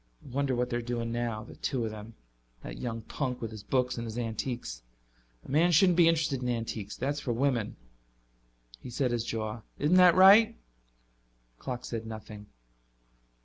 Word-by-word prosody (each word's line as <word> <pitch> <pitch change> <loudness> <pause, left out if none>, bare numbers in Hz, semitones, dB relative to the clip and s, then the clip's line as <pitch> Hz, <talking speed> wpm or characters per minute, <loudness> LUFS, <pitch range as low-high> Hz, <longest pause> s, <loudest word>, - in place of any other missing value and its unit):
"I - - -10
wonder 140 -1 0
what 125 0 -1
they're 120 0 0
doing 115 -1 -3
now, 115 -2 -2
the - - -12
two 125 -4 -2
of 110 - -3
them. 110 +1 -10 0.5
That - - -7
young 115 -2 -4
punk 125 +1 -3
with 115 -1 -5
his 110 -2 -8
books 125 +3 0
and 115 - -4
his 110 0 -6
antiques. 115 - -4 0.6
A - - -9
man 165 +5 +4
shouldn't 175 +2 +5
be 170 -1 +6
interested 155 -5 +1
in 125 - -2
antiques; 115 -3 -4
that's 145 +3 -2
for 125 -4 -2
women." 120 -3 0 1.0
He - - -9
set 125 +1 0
his 120 -2 0
jaw. 110 -1 -4 0.2
"Isn't 155 +6 +3
that 180 -2 +7
right?" 210 +5 +7 1.0
The - - -26
clock 125 -1 -4
said 115 -1 -5
nothing. 110 -1 -9
120 Hz, 180 wpm, -29 LUFS, 115-140 Hz, 1.0 s, that